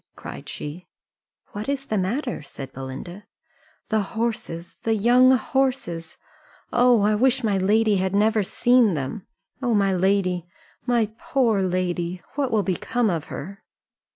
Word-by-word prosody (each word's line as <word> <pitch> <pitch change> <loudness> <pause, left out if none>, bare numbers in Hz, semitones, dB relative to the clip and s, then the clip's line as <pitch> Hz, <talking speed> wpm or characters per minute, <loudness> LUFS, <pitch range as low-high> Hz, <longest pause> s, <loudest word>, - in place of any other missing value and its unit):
cried - - -9
she. 170 +5 -7 0.6
"What 210 +5 -5
is 275 -1 -2
the 215 - -1
matter?" 240 - -2
said 135 -2 -9
Belinda. 135 +9 -8 0.6
"The 220 -1 +2 0.2
horses 220 -7 -3
the 225 -1 +1
young 245 +4 +5
horses! 250 -10 -1 0.6
Oh, 245 -2 +5
I 210 +1 +3
wish 255 +4 +2
my 205 -3 +1
lady 210 +2 +3
had 190 +1 0
never 215 +1 +3
seen 235 0 +3
them. 145 +8 -5 0.3
Oh, 240 -3 +1
my 195 -2 +3
lady, 185 -2 +1 0.4
my 235 -3 +2
poor 265 - +1
lady, 180 -1 -1
what 280 -2 0
will 220 -3 +2
become 210 +4 0
of 165 -3 -2
her?" 195 +8 -8
210 Hz, 140 wpm, -24 LUFS, 180-240 Hz, 0.6 s, young